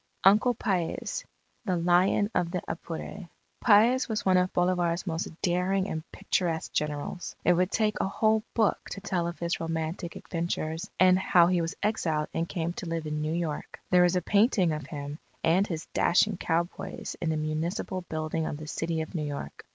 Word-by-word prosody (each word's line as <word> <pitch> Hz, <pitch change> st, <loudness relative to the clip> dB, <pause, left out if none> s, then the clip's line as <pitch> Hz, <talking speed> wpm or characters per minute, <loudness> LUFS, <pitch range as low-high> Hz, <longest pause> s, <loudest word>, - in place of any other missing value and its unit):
_ 195 Hz, -, +11 dB
UNCLE 240 Hz, +4 st, +2 dB
PAEZ 185 Hz, -6 st, -2 dB, 0.4 s
THE 185 Hz, -4 st, +1 dB
LION 180 Hz, +5 st, +3 dB
OF 175 Hz, -2 st, +1 dB
THE 180 Hz, 0 st, -3 dB
APURE 170 Hz, +3 st, -6 dB, 0.3 s
Paez 240 Hz, +4 st, +5 dB
was 220 Hz, -1 st, -2 dB
one 190 Hz, -1 st, +4 dB
of 180 Hz, 0 st, +2 dB
Bolivar's 175 Hz, -1 st, +1 dB
most 165 Hz, -2 st, -2 dB, 0.2 s
daring 185 Hz, +2 st, +1 dB
and 160 Hz, -, -3 dB
picturesque 165 Hz, -3 st, -1 dB
generals. 150 Hz, +4 st, -3 dB
It 180 Hz, -, +6 dB
would 180 Hz, +1 st, +2 dB
take 215 Hz, 0 st, +1 dB
a -, -, +1 dB
whole 215 Hz, +2 st, +2 dB
book 220 Hz, -3 st, +3 dB
to 195 Hz, -, -6 dB
tell 180 Hz, -3 st, -1 dB
of 170 Hz, -, -5 dB
his 170 Hz, 0 st, -2 dB
romantic 165 Hz, +1 st, -3 dB
adventures 165 Hz, -1 st, -3 dB
and 185 Hz, 0 st, +6 dB
how 175 Hz, -2 st, +5 dB
he 175 Hz, 0 st, +2 dB
was 165 Hz, 0 st, -3 dB
exiled 160 Hz, -8 st, 0 dB
and 165 Hz, +1 st, -1 dB
came 170 Hz, -2 st, -2 dB
to 180 Hz, -, -6 dB
live 165 Hz, -1 st, -2 dB
in 150 Hz, 0 st, -2 dB
New 155 Hz, +1 st, -1 dB
York. 165 Hz, -3 st, -3 dB
There 180 Hz, -1 st, +6 dB
is 175 Hz, +1 st, +2 dB
a 180 Hz, -, +1 dB
painting 200 Hz, -4 st, +3 dB
of 150 Hz, -3 st, -4 dB
him 145 Hz, 0 st, -6 dB, 0.2 s
and 180 Hz, +5 st, +3 dB
his 165 Hz, -3 st, -4 dB
dashing 190 Hz, +2 st, +3 dB
cowboys 175 Hz, +3 st, -2 dB
in 165 Hz, -, 0 dB
the 160 Hz, -, 0 dB
Municipal 160 Hz, +5 st, -2 dB
Building 155 Hz, 0 st, -2 dB
of 145 Hz, -, -4 dB
the 155 Hz, -, -8 dB
City 165 Hz, +1 st, -2 dB
of 160 Hz, -, -6 dB
New 155 Hz, -4 st, -2 dB
York. 140 Hz, -, -7 dB
175 Hz, 190 wpm, -28 LUFS, 160-190 Hz, 0.4 s, _